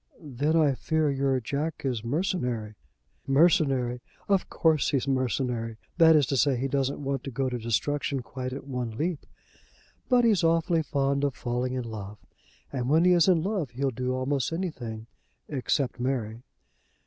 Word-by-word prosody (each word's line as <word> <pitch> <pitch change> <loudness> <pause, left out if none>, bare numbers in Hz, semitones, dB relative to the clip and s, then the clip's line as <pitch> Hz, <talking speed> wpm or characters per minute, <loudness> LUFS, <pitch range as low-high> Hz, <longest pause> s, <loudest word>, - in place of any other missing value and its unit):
"Then 145 +1 -1
I 155 -4 +4
fear 155 +2 0
your 135 -1 +1
Jack 145 +6 -3
is 120 -5 -1
mercenary." 125 - -2 0.5
"Mercenary; 135 -5 +3 0.3
of 195 -2 +1
course 160 -4 +2
he's 135 -1 0
mercenary. 125 -3 -1 0.2
That 160 -1 +7
is 150 -2 +5
to 135 +2 -1
say, 135 -1 +3
he 135 +3 -1
doesn't 140 +1 -1
want 135 -2 -2
to - - -5
go 135 +1 -1
to 125 -1 -3
destruction 135 +4 -1
quite 130 +1 -5
at 135 +1 -7
one 125 -5 -4
leap. 160 +1 -2 0.8
But 245 -2 +4
he's 210 -7 +3
awfully 165 0 +2
fond 140 -2 0
of 140 -3 0
falling 125 +1 -2
in 130 -1 -2
love, 105 -3 -7 0.6
and 125 -2 -2
when 160 +4 +4
he 180 - +6
is 175 -1 +5
in 175 -4 +4
love 190 - -1
he'll 135 +3 -1
do 125 +1 -2
almost 130 +1 -1
anything, 130 -11 -4 0.4
except 130 -2 -1
marry." 120 -3 -2
135 Hz, 165 wpm, -27 LUFS, 125-155 Hz, 0.8 s, That